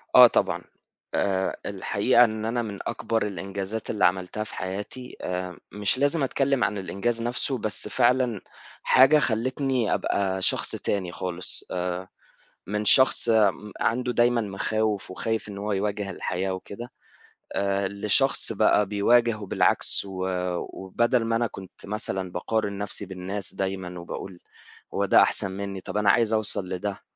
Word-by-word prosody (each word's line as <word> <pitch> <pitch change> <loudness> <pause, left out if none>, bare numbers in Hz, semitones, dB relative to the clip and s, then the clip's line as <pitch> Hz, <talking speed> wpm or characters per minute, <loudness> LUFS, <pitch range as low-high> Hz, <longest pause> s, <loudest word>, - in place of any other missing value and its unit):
آه - - +11
طبعًا، - - 0 0.5
آآ، 95 -1 0
الحقيقة 105 +5 +3
إن 110 -2 -1
أنا 120 +2 0
من 105 -3 -6
أكبر 115 -2 -1
الإنجازات 100 +3 -5
اللي 105 - +2
عملتها 95 +4 0
في - - -10
حياتي 100 +7 -6
آآ، 90 -1 -4
مش 105 +3 +1
لازم 145 +2 +2
أتكلّم 135 -1 +1
عن 105 - 0
الإنجاز 100 +5 -2
نَفْسه 125 +3 -1
بس 110 -2 -1
فعلًا، 125 -3 +2 0.4
حاجة 135 +4 +6
خلتني 130 -1 0
أبقى 95 -1 0
شخص - - +1
تاني 95 -3 -2
خالص 90 0 -2
آآ، 90 0 -3 0.6
من 105 +2 -2
شخص 130 +1 +5
م 105 -2 +2
عنده 125 +2 +1
دايمًا 120 0 +3
مخاوف 105 0 -1
وخايف 110 +3 -3
إن 100 - -7
هو 105 +1 -3
يواجه 100 0 -2
الحياة 95 +2 -2
وكده، 100 +6 -8 0.6
آآ، 100 0 0
لشخص 105 +7 +2
بقى 105 0 +3
بيواجهه 110 +3 +2
وبالعكس 100 - +2
و 95 -1 -4
آآ، 90 -1 -1
وبدل 120 +6 0
ما 115 0 0
أنا 120 +1 +1
كُنت 95 -3 -11
مثلًا 95 -3 -3
باقارن 100 +2 -2
نَفْسي 100 0 -2
بالناس 95 +1 -5
دايمًا 95 -2 -4
وباقول، 90 +1 -7 0.5
هو - - +1
ده - - +6
أحسن 95 - +1
مِنّي 100 0 -5
طَب 105 - -5
أنا 105 -1 +3
عايز 115 -2 +2
أوصل 105 -3 0
لده، 95 +2 -4
105 Hz, 150 wpm, -25 LUFS, 95-115 Hz, 0.6 s, آه